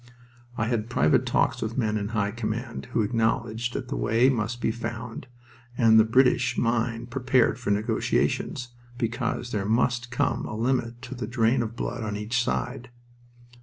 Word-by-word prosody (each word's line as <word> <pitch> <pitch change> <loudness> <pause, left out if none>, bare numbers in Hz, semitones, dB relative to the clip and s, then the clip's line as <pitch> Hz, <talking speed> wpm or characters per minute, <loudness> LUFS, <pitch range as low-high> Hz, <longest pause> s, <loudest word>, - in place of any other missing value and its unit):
I 110 - +1
had 115 -1 -1
private 80 -11 +3
talks - - +1
with 110 +3 -3
men 110 -4 +1
in 100 -1 -1
high 105 -2 -1
command, 115 +2 -4
who 120 -2 0
acknowledged 115 +1 0
that 125 - -4
the 140 - -2
way 115 +4 +3
must 120 -1 -1
be 115 - +1
found, 120 0 -6 0.5
and 110 -2 +6
the - - +8
British 125 +2 +3
mind 115 0 0
prepared 125 -1 +2
for 120 - -3
negotiations, 110 +3 0 0.3
because 120 0 -2
there 105 -2 -1
must 120 +2 +1
come 120 -1 0
a - - -5
limit 120 0 -1
to - - -6
the 125 -4 -5
drain 115 +1 +2
of 115 0 -4
blood 120 0 -3
on 105 -1 -3
each 115 +3 0
side. 125 +1 -3
115 Hz, 165 wpm, -26 LUFS, 110-125 Hz, 0.5 s, the